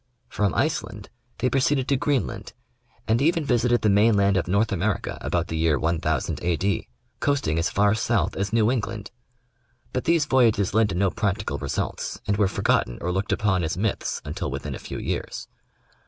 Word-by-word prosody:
From 105 -2 0
Iceland 130 -9 -2 0.3
they 125 - +1
proceeded 135 -1 +2
to 140 - +3
Greenland 140 0 -1 0.5
and 115 +3 +2
even 165 +1 +2
visited 120 -1 +2
the 105 - +4
main 105 +2 +4
land 100 -1 +3
of 95 - 0
North 100 +5 +1
America 100 +1 -1
about - - -1
the 80 - -3
year 80 -2 +2
1000 80 -3 -1
A. 85 -1 +1
D., 100 +3 -1 0.3
coasting 130 - +1
as 85 - +1
far 100 +1 +3
south 115 +1 0
as 100 +1 -2
New 115 0 +3
England; 110 -4 -3 0.8
but 125 - -2
these 165 -2 +3
voyages 115 -8 +3
led 110 0 +3
to 95 - -3
no 95 +1 +2
practical 105 0 -2
results, - - -3
and 100 -1 0
were 100 -2 +3
forgotten - - 0
or 90 - -2
looked 95 +2 -2
upon 95 -4 +1
as 80 +2 -2
myths, 105 +2 -2
until - - -4
within - - -5
a - - -6
few - - -7
years. - - -4
105 Hz, 185 wpm, -24 LUFS, 95-120 Hz, 0.8 s, the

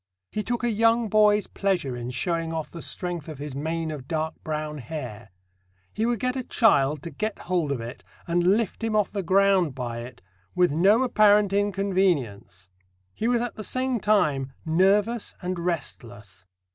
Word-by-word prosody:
He 215 - -2
took 240 +3 -3
a 240 - +2
young 225 +1 +2
boy's 210 0 +4
pleasure 175 -10 -1
in 120 0 -5
showing 165 +6 -2
off 160 -1 -4
the 170 - -8
strength 175 -3 -5
of 155 - -7
his 145 0 -6
mane 160 +3 -3
of 140 -4 -7
dark 160 -1 -2
brown 150 -1 -4
hair. 120 -5 -7 0.6
He 220 +2 0
would 240 -2 0
get 250 +3 -1
a 260 - -1
child 150 - +2
to 170 - -6
get 215 +8 -3
hold 175 -5 0
of 135 - -1
it, 120 +2 -8 0.2
and 175 +4 +3
lift 230 0 -3
him 225 -1 0
off 210 -3 +2
the 200 - -2
ground 190 -4 +3
by 120 -3 -4
it 120 +1 -10 0.3
"with 180 -3 +3
no 195 - +4
apparent 210 -4 +4
inconvenience." 185 - 0 0.5
He 225 - -2
was 240 -1 +2
at 240 -1 -3
the 215 - -5
same 255 +1 -1
time 150 -11 +1
nervous 200 +7 +2
and 180 -1 -3
restless. 110 - -5
175 Hz, 175 wpm, -25 LUFS, 145-210 Hz, 0.6 s, boy's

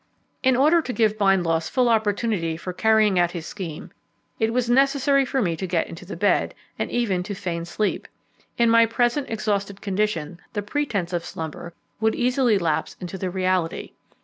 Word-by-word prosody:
In 260 -1 +3
order 305 +6 +4
to 255 - -5
give 215 -2 +1
Bindloss 175 -5 +2
full 250 -2 +2
opportunity 210 -6 0
for 180 +2 -6
carrying 215 -2 +3
out 175 -1 +3
his 170 -3 -5
scheme, 170 -5 -7 0.5
it 220 -1 +1
was 245 0 0
necessary 275 +2 +3
for 260 -1 0
me 170 -3 0
to 190 +3 -4
get 170 -2 0
into 180 +3 -9
bed, 205 +4 +1 0.2
and - - -1
even 205 -7 0
to 200 +3 -5
feign 170 -3 -4
sleep. 210 +4 -2 0.5
In 235 - +4
my 230 0 +5
present 240 +5 0
exhausted 205 -3 -2
condition 190 -5 -2
the 205 -2 -2
pretence 205 -7 -2
of 170 -1 -1
slumber 160 +1 -7 0.2
would 220 0 +1
easily 250 -3 +2
lapse 165 -5 -1
into 180 +1 -6
the 185 - -2
reality. 185 -2 -1
205 Hz, 175 wpm, -23 LUFS, 175-235 Hz, 0.5 s, my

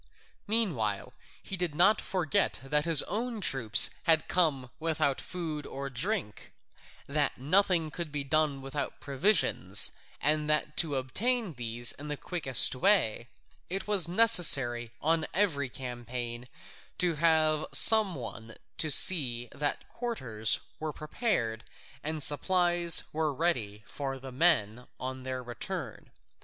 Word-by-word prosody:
Meanwhile 150 - -2 0.3
he 195 - -4
did 175 -5 -4
not 195 +6 +3
forget 180 -6 -1
that 150 +3 -1
his 165 -4 +3
own 230 +3 -5
troops 130 - +6
had 160 -2 +2
come 140 -8 0
without 155 -4 -1
food 160 -5 -6
or 140 0 -7
drink, 155 - -3 0.5
that 145 +1 -2
nothing 165 +2 +1
could 170 -2 -6
be 145 -1 -4
done 145 -1 -1
without 140 +1 -6
provisions, 145 +10 +2 0.3
and 150 +1 0
that 150 0 0
to 155 -4 0
obtain 210 - -1
these 120 -1 0
in 145 - -8
the 150 -1 -5
quickest 145 -9 +4
way, 130 - +1 0.4
it 190 +2 -4
was 200 -5 +2
necessary 165 - +4
on 160 +1 0
every 155 -9 0
campaign 120 -1 -7 0.5
to 180 -2 0
have 155 -1 +1
some 215 -5 +4
one 115 -2 -9 0.2
to 155 - +2
see 125 -8 +5
that 145 0 -4
quarters 120 - -1 0.2
were 155 -1 -4
prepared 150 - -3 0.4
and 155 -1 -1
supplies 175 +2 +3
ready 150 -9 -2
for 135 +5 -6
the 130 0 -10
men 125 -6 +1
on 130 0 -6
their 130 0 -6
return. 125 - -7
150 Hz, 125 wpm, -28 LUFS, 130-175 Hz, 0.5 s, troops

